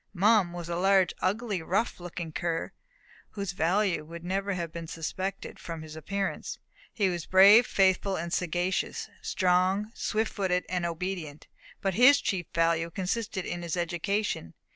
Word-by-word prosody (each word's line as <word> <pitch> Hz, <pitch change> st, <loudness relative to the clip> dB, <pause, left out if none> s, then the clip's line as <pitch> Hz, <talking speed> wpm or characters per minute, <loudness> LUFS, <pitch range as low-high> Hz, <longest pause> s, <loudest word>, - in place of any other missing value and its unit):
Mum 200 Hz, -1 st, +4 dB
was 175 Hz, -1 st, -6 dB
a 170 Hz, 0 st, -2 dB
large, 190 Hz, -1 st, +3 dB
ugly, 205 Hz, -1 st, -1 dB
rough 195 Hz, +8 st, -1 dB
looking 175 Hz, -2 st, -6 dB
cur, 165 Hz, +1 st, -2 dB, 0.6 s
whose 200 Hz, -4 st, -4 dB
value 180 Hz, +1 st, +1 dB
would 165 Hz, +2 st, -10 dB
never 195 Hz, +2 st, -1 dB
have 170 Hz, -3 st, -4 dB
been 165 Hz, 0 st, -7 dB
suspected 185 Hz, +5 st, -5 dB
from 165 Hz, -2 st, -6 dB
his 155 Hz, 0 st, -10 dB
appearance. 195 Hz, +5 st, -3 dB, 0.3 s
He 200 Hz, -3 st, +1 dB
was 175 Hz, -3 st, -3 dB
brave, 200 Hz, +5 st, +8 dB
faithful, 190 Hz, 0 st, +2 dB
and 170 Hz, +1 st, -4 dB
sagacious; 180 Hz, +1 st, -1 dB
strong, 185 Hz, +3 st, +1 dB
swift 220 Hz, 0 st, -1 dB
footed, 185 Hz, -3 st, 0 dB
and 180 Hz, -2 st, -1 dB
obedient. 170 Hz, -3 st, -5 dB, 0.4 s
But 195 Hz, -1 st, +1 dB
his 250 Hz, +7 st, +7 dB
chief 180 Hz, -5 st, -2 dB
value 165 Hz, 0 st, +1 dB
consisted 190 Hz, +3 st, -3 dB
in 175 Hz, 0 st, -4 dB
his 170 Hz, 0 st, -3 dB
education. 175 Hz, -, -2 dB
180 Hz, 150 wpm, -28 LUFS, 170-195 Hz, 0.6 s, brave